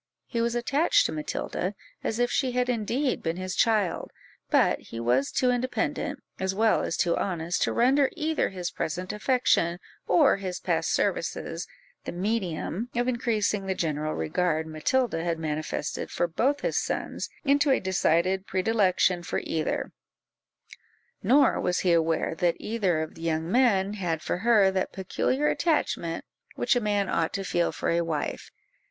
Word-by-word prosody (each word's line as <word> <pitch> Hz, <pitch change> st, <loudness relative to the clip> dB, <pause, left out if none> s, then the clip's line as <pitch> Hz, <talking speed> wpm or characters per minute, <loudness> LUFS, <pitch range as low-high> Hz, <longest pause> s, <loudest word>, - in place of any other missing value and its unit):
He 230 Hz, -, -2 dB
was 235 Hz, +1 st, 0 dB
attached 275 Hz, +7 st, +3 dB
to -, -, 0 dB
Matilda, 170 Hz, +5 st, -3 dB, 0.3 s
as 220 Hz, -, -1 dB
if 245 Hz, 0 st, +1 dB
she 260 Hz, -2 st, 0 dB
had 250 Hz, 0 st, +1 dB
indeed 245 Hz, +4 st, 0 dB
been 165 Hz, +1 st, -2 dB
his 185 Hz, 0 st, -4 dB
child, 215 Hz, -5 st, +1 dB, 0.4 s
but -, -, +3 dB
he 115 Hz, -, -9 dB
was 125 Hz, +4 st, +1 dB
too 250 Hz, -1 st, +2 dB
independent, 250 Hz, +1 st, -2 dB, 0.2 s
as 190 Hz, 0 st, -1 dB
well 220 Hz, +1 st, +3 dB
as -, -, -2 dB
too 170 Hz, -2 st, +2 dB
honest, 175 Hz, -2 st, -2 dB
to -, -, +2 dB
render 265 Hz, +3 st, +3 dB
either 320 Hz, -2 st, 0 dB
his 180 Hz, -2 st, -4 dB
present 180 Hz, +4 st, -3 dB
affection, 210 Hz, -7 st, +2 dB, 0.3 s
or 180 Hz, -, +5 dB
his 185 Hz, -2 st, -4 dB
past -, -, 0 dB
services, -, -, -1 dB, 0.4 s
the -, -, -3 dB
medium 190 Hz, +2 st, -2 dB
of 240 Hz, +1 st, +1 dB
increasing 215 Hz, -5 st, 0 dB
the 190 Hz, -, 0 dB
general 155 Hz, -2 st, -1 dB
regard 160 Hz, -, 0 dB
Matilda 165 Hz, +5 st, 0 dB
had 170 Hz, -1 st, -1 dB
manifested 155 Hz, -1 st, -3 dB
for 175 Hz, -, 0 dB
both 270 Hz, -, 0 dB
his -, -, +1 dB
sons -, -, -3 dB, 0.2 s
into 285 Hz, +1 st, +3 dB
a 265 Hz, -, +4 dB
decided 185 Hz, 0 st, +1 dB
predilection 190 Hz, -2 st, +2 dB
for 175 Hz, -, -3 dB
either: 160 Hz, -1 st, -2 dB, 1.3 s
nor 275 Hz, +1 st, +4 dB
was 180 Hz, -, 0 dB
he 180 Hz, -2 st, +3 dB
aware 165 Hz, -1 st, +1 dB
that 170 Hz, +1 st, +1 dB
either 195 Hz, -8 st, 0 dB
of 155 Hz, -, -8 dB
the 165 Hz, -, -13 dB
young 165 Hz, +1 st, -1 dB
men 205 Hz, -6 st, +3 dB
had 175 Hz, -6 st, -2 dB
for -, -, -2 dB
her 210 Hz, -3 st, +4 dB
that 190 Hz, -1 st, -2 dB
peculiar 255 Hz, +9 st, 0 dB
attachment 295 Hz, -, 0 dB, 0.3 s
which -, -, +2 dB
a 245 Hz, -, +1 dB
man 205 Hz, -2 st, +1 dB
ought 165 Hz, -3 st, 0 dB
to 195 Hz, -, -2 dB
feel 175 Hz, -2 st, 0 dB
for -, -, -2 dB
a 170 Hz, 0 st, +2 dB
wife. 165 Hz, -3 st, -3 dB
190 Hz, 160 wpm, -27 LUFS, 170-235 Hz, 1.3 s, or